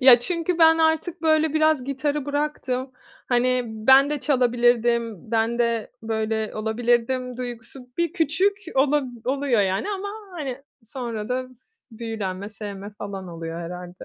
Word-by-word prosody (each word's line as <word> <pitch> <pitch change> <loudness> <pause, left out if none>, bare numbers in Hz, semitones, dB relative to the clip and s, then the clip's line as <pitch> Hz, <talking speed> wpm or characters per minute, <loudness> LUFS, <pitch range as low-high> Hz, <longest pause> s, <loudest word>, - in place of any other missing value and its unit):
Ya, 255 -2 +9
çünkü 335 +6 -1
ben 325 0 +7
artık 320 +2 +1
böyle 315 -1 +3
biraz 310 -4 +3
gitarı 285 +1 -1
bıraktım. 285 -3 -2 0.4
Hani, 250 0 +2
ben 265 +6 +5
de 295 -2 -2
çalabilirdim, 240 - +2
ben 230 +1 +1
de 235 -2 0
böyle 220 -1 -1
olabilirdim 240 +3 0
duygusu 245 +1 -7
bir 340 -1 +1
küçük 370 +4 +1 0.2
olab 280 +1 +3 0.2
oluyor 265 -3 +1
yani 190 - 0
ama, 405 0 -3 0.2
hani, 275 -5 -5 0.2
sonra 230 -2 -5
da 255 0 -2
s 450 - -26
büyülenme, 205 -4 -4
sevme 205 -1 -7
falan 195 -2 -6
oluyor 165 0 -6
herhâlde. 180 +1 -8
250 Hz, 135 wpm, -24 LUFS, 220-295 Hz, 0.4 s, Ya